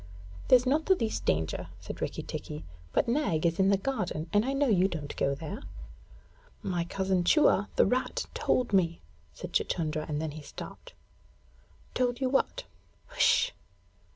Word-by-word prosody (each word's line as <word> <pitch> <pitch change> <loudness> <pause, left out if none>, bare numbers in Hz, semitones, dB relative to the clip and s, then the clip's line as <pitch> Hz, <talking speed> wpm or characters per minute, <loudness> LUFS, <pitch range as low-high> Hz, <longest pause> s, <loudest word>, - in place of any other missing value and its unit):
'There's 250 0 +6
not 295 +5 +1
the 380 - +6
least 225 -9 -2
danger,' 80 +1 0
said - - -8
Rikki - - -3
tikki; 75 +3 -6 0.3
'but - - +2
Nag 235 - +1
is 170 +2 +1
in 190 0 +4
the 200 - +4
garden, 200 -8 -2
and 205 +1 +4
I 265 - -1
know 275 +1 +2
you 190 -7 +4
don't 155 -6 -5
go 140 - +1
there.' 155 +2 -6 1.0
'My 175 -2 -1
cousin 190 0 0
Chua, 205 - +4
the - - +5
rat, 255 +1 0
told 245 -4 0
me 170 -3 +2 0.2
' 75 +1 -32
said - - -8
Chuchundra, 155 -2 0
and 150 -1 -1
then 155 -1 -3
he 155 +1 -8
stopped. - - -10 1.0
'Told 245 -1 0
you 260 -2 +1
what?' 390 - +1 0.5
'H'sh! - - +4
190 Hz, 165 wpm, -29 LUFS, 160-255 Hz, 1.0 s, There's